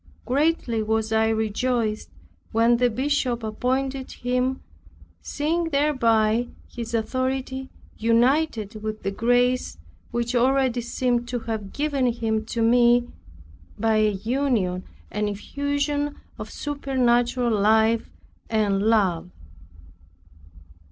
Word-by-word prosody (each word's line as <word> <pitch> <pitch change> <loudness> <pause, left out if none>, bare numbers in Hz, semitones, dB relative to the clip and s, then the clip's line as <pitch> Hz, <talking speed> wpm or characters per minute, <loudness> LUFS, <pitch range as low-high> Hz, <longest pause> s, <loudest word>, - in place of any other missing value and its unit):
Greatly 275 -4 +1
was 220 0 -1
I 220 0 +3
rejoiced 220 0 -1 0.4
when 230 +1 +4
the 245 0 +3
Bishop 255 -1 -1
appointed 260 +4 -2
him, 250 +1 -1 0.6
seeing 325 +4 -1
thereby 240 -7 +2 0.2
his 235 -1 -5
authority 260 +3 -2 0.3
united 230 -2 +1
with 215 0 -5
the 195 - -1
grace 245 - +1 0.3
which 240 +1 -2
already 255 0 +2
seemed 240 0 -1
to 245 -1 -3
have 220 -4 -4
given 285 -3 0
him 225 -2 -1
to 230 -1 -1
me, 240 +1 +4 0.7
by 220 0 +2
a 215 0 +4
union 210 -3 -1 0.3
and 210 0 -1
effusion 285 +6 -2 0.2
of - - -6
supernatural 250 -4 0
life 220 +2 +3 0.4
and 205 -3 +1
love. 200 -6 +2
240 Hz, 105 wpm, -24 LUFS, 220-260 Hz, 0.7 s, when